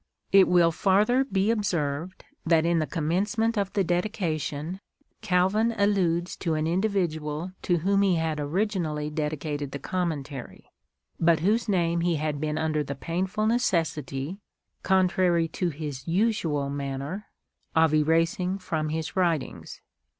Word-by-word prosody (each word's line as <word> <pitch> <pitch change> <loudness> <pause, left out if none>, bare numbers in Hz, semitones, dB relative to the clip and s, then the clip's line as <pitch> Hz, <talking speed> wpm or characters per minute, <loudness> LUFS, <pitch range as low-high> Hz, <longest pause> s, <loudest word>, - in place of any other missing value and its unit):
It 195 -1 +7
will 175 -2 +4
farther 210 +9 +3
be 200 -4 +1
observed 175 -5 -2 0.2
that 165 -1 +3
in 170 -1 +2
the 155 - -1
commencement 205 +8 0
of 200 -2 -1
the 200 - +2
Dedication, 175 -3 -2 0.4
Calvin 210 +3 +2
alludes 185 -4 +1
to 165 -3 -1
an 155 0 0
individual 170 -3 -1
to 175 - +1
whom 195 +4 +2
he 195 -3 +3
had 160 -2 -1
originally 155 -2 -1
dedicated 150 -2 -3
the - - -2
Commentary, 145 -5 -4 0.5
but 165 -1 +3
whose 220 +5 +1
name 170 -3 +1
he 170 -1 +1
had 150 -1 -2
been 155 0 -1
under 155 -1 0
the 140 0 -5
painful 185 +8 -2
necessity 170 - -1 0.2
— - - -53
contrary 180 -3 +3
to 175 +2 -1
his 145 -3 -6
usual 165 -7 0
manner 140 +7 -4 0.2
— - - -44
of 160 -1 +4
erasing 165 +5 +2
from 160 -5 -2
his 160 +2 -3
writings. 170 -7 -1
170 Hz, 140 wpm, -26 LUFS, 155-190 Hz, 0.5 s, It